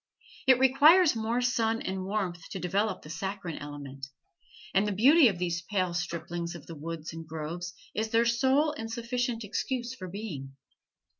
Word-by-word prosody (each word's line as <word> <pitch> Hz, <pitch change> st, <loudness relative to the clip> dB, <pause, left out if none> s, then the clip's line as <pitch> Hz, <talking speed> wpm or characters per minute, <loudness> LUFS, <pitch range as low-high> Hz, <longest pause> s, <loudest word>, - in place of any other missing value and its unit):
It 260 Hz, -2 st, +7 dB
requires 290 Hz, +5 st, +6 dB
more 225 Hz, +2 st, 0 dB
sun 230 Hz, -2 st, +1 dB
and 190 Hz, 0 st, -3 dB
warmth 185 Hz, -4 st, -3 dB
to 190 Hz, -, -5 dB
develop 195 Hz, +3 st, -1 dB
the 150 Hz, -, -11 dB
saccharine 190 Hz, -1 st, -4 dB
element, 140 Hz, -2 st, -8 dB, 0.7 s
and 195 Hz, +2 st, +3 dB
the -, -, 0 dB
beauty 265 Hz, -, +6 dB
of 195 Hz, -5 st, 0 dB
these 170 Hz, -1 st, -1 dB
pale 185 Hz, -1 st, -1 dB
striplings 170 Hz, 0 st, -3 dB
of 165 Hz, -, -10 dB
the 165 Hz, -, -8 dB
woods 160 Hz, +1 st, -6 dB
and 165 Hz, -1 st, -8 dB
groves 165 Hz, +3 st, -5 dB, 0.2 s
is 220 Hz, +1 st, -1 dB
their 230 Hz, +1 st, +3 dB
sole 265 Hz, +6 st, +3 dB
and 225 Hz, -7 st, -6 dB
sufficient 235 Hz, 0 st, -2 dB
excuse 240 Hz, +4 st, -2 dB
for 185 Hz, -8 st, -8 dB
being. 170 Hz, -9 st, -6 dB
195 Hz, 165 wpm, -29 LUFS, 170-235 Hz, 0.7 s, It